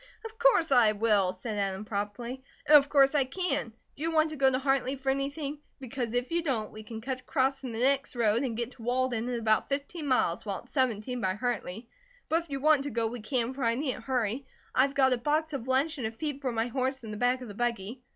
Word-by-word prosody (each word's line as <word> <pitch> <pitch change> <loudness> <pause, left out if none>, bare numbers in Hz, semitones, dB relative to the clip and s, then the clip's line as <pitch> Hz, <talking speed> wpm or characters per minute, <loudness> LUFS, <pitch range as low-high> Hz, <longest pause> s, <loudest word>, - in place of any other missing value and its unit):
"Of 445 0 -9
course 470 - +4
I 235 -5 +6
will," 205 -3 +2
said 205 +3 -5
Adam 195 +1 -2
promptly. 220 +5 -4 0.2
"And 300 0 +7
of 285 -1 +7
course 275 -1 +5
I 290 -2 +4
can. 280 -3 -2 0.2
Do - - -13
you 325 - 0
want 315 -1 +3
to - - -5
go 270 -2 +4
to 255 - +1
Hartley 270 0 +1
for 270 0 -1
anything? 280 +2 -3 0.2
Because 245 -2 -4
if 245 +3 -1
you 340 0 +1
don't, 250 -9 -2
we 215 - -9
can 220 +1 -8
cut 260 +2 -3
across 270 0 0
from 255 -3 -5
the 225 - -5
next 275 +2 +2
road 230 -1 +2
and 245 -5 -2
get 235 +1 -3
to 245 - -15
Walden 245 0 0
in 245 -1 -1
about 220 -1 +2
fifteen 285 +3 -3
miles, 225 -9 +1
while 200 -3 -4
it's 245 - -20
seventeen 250 -2 0
by 185 -2 0
Hartley; 230 -2 -3 0.4
but 330 +2 +2
if 335 - -17
you 275 -1 -3
want 295 -1 +4
to - - -2
go 230 -2 -1
we 235 +2 -3
can, 235 +2 -1
for 265 0 -5
I 230 0 +2
needn't 255 -3 -3
hurry. 250 +1 -1 0.3
I've 275 +2 +3
got 265 -2 +4
a 245 - -1
box 305 +4 0
of 260 -3 -4
lunch 280 +4 +1
and 230 - -1
a - - -5
feed 280 +3 -4
for 260 -3 -1
my 225 -1 0
horse 260 +1 -2
in 220 - -7
the 210 - -5
back 245 +3 +1
of 250 - -7
the 205 - -8
buggy. 235 +1 -3
255 Hz, 250 wpm, -29 LUFS, 230-275 Hz, 0.4 s, And